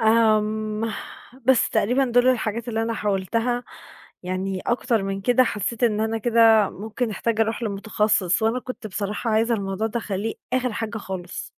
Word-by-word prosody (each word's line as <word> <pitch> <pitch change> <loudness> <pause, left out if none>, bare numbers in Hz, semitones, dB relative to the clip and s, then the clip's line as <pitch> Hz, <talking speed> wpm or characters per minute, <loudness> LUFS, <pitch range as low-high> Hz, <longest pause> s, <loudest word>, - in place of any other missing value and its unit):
آمم 215 -1 +2 0.5
بس 260 -1 +4
تقريبًا 250 +6 +2
دُول 245 0 +3
الحاجات 235 -2 0
اللي 225 -1 -1
أنا 230 0 -1
حاولتها 225 +5 -1 0.6
يعني 185 +1 -3
أكتر 240 -2 +1
من 195 0 -3
كده 245 +5 +4
حسّيت 220 +1 -3
إن 215 -2 +2
أنا 220 +1 0
كده 225 -2 +5
ممكن 220 +4 -4
أحتاج 225 +2 -1
أروح 225 +1 0
لمُتخصّص 210 -2 +1
وأنا 225 +3 +2
كنت 250 -3 -7
بصراحة 210 +3 -3
عايزة 225 +2 +2
الموضوع 200 0 -2
ده 225 - -2
أخلّيه 210 +1 -3 0.2
آخِر 255 -2 0
حاجة 225 +1 -4
خالص. 185 -3 -6
220 Hz, 155 wpm, -23 LUFS, 205-235 Hz, 0.6 s, كده